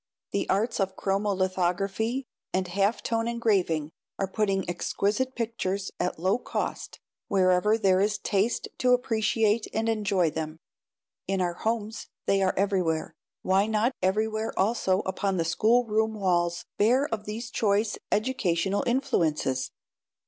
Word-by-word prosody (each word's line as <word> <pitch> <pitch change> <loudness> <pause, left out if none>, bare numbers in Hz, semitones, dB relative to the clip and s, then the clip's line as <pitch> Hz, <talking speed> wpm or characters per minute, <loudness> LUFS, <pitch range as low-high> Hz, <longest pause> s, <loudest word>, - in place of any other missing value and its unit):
The - - -1
arts 220 +5 +1
of 190 -1 0
chromo 200 +1 0
lithography 190 +7 0 0.3
and 185 0 0
half 200 +4 +1
tone 230 0 0
engraving 190 -10 +1 0.3
are 195 - -1
putting 195 -2 0
exquisite 210 +8 -1
pictures, 200 -5 -2
at 180 - -1
low 190 +7 +1
cost, - - -4 0.3
wherever 190 +3 +3
there 190 -3 +3
is 210 +1 +1
taste 205 +3 0
to 250 -1 +4
appreciate 225 -2 +1
and 220 +1 0
enjoy 200 -7 +1
them. 155 0 -4 0.7
In 195 0 0
our 175 -1 0
homes 220 +2 -3 0.2
they 195 0 +2
are 190 -1 +2
everywhere. 180 -5 0 0.3
Why 190 +2 +3
not 220 +3 +1
everywhere 215 +4 0
also 190 -2 +2
upon 190 0 -1
schoolroom 220 +4 +2
walls 175 -4 0
bare 250 +7 +4
of 210 -1 -3
these 225 +2 -5
choice 210 -1 +1
educational 200 -5 +1
influences? 155 - 0
200 Hz, 130 wpm, -27 LUFS, 185-225 Hz, 0.7 s, to